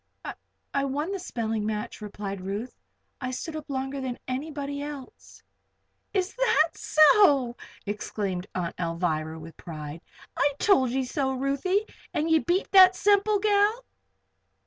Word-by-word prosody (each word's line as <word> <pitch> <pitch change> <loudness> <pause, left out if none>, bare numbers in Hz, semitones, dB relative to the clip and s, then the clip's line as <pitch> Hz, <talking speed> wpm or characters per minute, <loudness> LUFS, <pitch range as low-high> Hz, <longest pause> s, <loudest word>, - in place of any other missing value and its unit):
"I 275 - +1
won 295 +6 -2
the 395 - -3
spelling 225 -10 -3
match," 210 0 -4
replied 200 -2 -6
Ruth. 200 +6 -5 0.5
"I 250 - -2
stood 310 +5 -5
up 310 -1 -7
longer 270 0 -3
than 255 -2 -3
anybody 285 +1 -4
else." 285 -3 -9 0.7
"Is 380 -1 -1
that 335 - +3
so!" 290 - +5 0.3
exclaimed 200 -2 -3
Aunt 175 -2 -2
Alvirah, 165 -2 -2
with 160 +1 -11
pride. 155 -1 -8 0.3
"I 285 0 +2
told 270 - +4
ye 260 +2 -1
so, 265 +1 -1
Ruthie. 280 +10 0 0.3
And 315 +2 0
ye 320 - +6
beat 350 +5 0
that 375 -1 +8
Semple 410 +2 +3
gal?" 425 +3 +2
270 Hz, 135 wpm, -27 LUFS, 210-330 Hz, 0.7 s, that